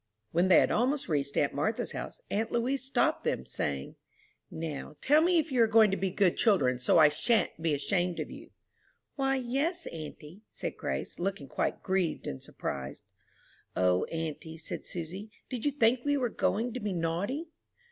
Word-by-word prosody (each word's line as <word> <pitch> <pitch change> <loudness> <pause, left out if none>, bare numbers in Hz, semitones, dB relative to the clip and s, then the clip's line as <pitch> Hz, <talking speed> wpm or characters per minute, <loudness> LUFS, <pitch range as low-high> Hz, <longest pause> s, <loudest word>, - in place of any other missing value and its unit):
When 175 +3 +3
they 185 - +7
had - - +2
almost 265 +5 +1
reached 140 -3 -1
aunt 145 - +2
Martha's 150 +10 -1
house, - - -6
aunt 220 +2 0
Louise 255 +3 0
stopped 265 - +1
them, 65 - -1
saying, 70 +1 -3 0.5
"Now, 155 -2 -5
tell 300 +3 +4
me 350 +1 +4
if 315 -2 +1
you 250 -2 +3
are 225 - +6
going 220 -2 +6
to - - +2
be 195 -1 -1
good 185 -1 +2
children, 155 - +3
so 125 - +3
I 155 -2 +9
shan't 165 +4 +1
be 160 -2 +2
ashamed 175 +4 0
of - - -4
you?" - - -10 0.7
"Why, 270 -1 +1
yes, 275 +8 -1
auntie," 155 +3 -8
said - - -5
Grace, - - -4
looking 185 -6 -2
quite - - -2
grieved 190 -3 0
and 65 - -5
surprised. 70 0 -5 0.7
"O, 90 0 +3
auntie," 160 0 -5
said 160 - -6
Susy, 180 +5 -6 0.2
"did 250 -1 -4
you 290 - +3
think 250 -2 +3
we 285 0 +2
were 250 -3 0
going 225 +2 0
to 255 - -3
be 205 -3 -2
naughty?" 180 - -1
195 Hz, 180 wpm, -30 LUFS, 160-250 Hz, 0.7 s, I